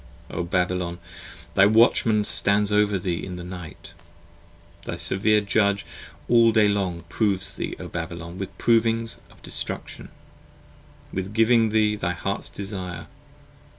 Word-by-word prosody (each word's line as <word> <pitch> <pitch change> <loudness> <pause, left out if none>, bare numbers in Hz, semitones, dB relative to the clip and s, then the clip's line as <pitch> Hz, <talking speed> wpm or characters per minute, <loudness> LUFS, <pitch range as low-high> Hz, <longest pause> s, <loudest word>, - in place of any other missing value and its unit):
O - - -3
Babylon, 90 0 -1 0.6
thy 95 +2 +6
Watchman 110 -1 +4
stands 100 +1 +3
over 105 -1 +3
thee 90 -2 -3
in 90 - -6
the 90 - -7
night, 90 -3 -9 0.9
Thy - - -4
severe 105 +2 +3
Judge 100 0 +1 0.4
all 115 -1 +5
the 110 -1 +4
day - - +5
long 95 -5 -1
proves 100 -1 -1
thee, - - -4
O - - -6
Babylon, 85 +1 -6
With 95 0 -6
provings 115 0 +1
of - - -21
destruction, - - -5 1.0
with 95 +2 -4
giving 115 0 +4
thee 105 -1 +2
thy 90 -4 -2
hearts 100 +3 -3
desire. 95 -4 -5
100 Hz, 135 wpm, -24 LUFS, 90-110 Hz, 1.0 s, thy